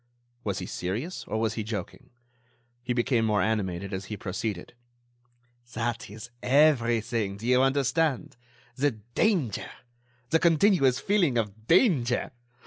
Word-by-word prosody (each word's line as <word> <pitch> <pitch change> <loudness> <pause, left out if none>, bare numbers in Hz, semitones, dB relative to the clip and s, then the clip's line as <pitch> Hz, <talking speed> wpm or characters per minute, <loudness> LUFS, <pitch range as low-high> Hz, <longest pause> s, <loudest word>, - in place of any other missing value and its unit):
Was 100 -3 -2
he - - -4
serious? 110 - -4
Or 110 - -2
was 110 -1 0
he 110 - -3
joking? 105 -4 -6 0.7
He 125 +1 -4
became 120 -1 +1
more 105 -2 +2
animated 100 -4 -2
as 95 +1 -4
he 105 - -6
proceeded: 100 0 -4 1.0
"That 120 +1 -2
is 110 +3 -10
everything, 120 -7 +2
do 110 - -9
you 125 +1 +4
understand, 140 +2 +1 0.4
the 140 +1 +1 0.2
danger! 175 - +1 0.6
The 165 - +4
continuous 165 -6 +4
feeling 180 - +2
of 110 0 -3
danger! 160 - +3
120 Hz, 130 wpm, -27 LUFS, 105-140 Hz, 1.0 s, you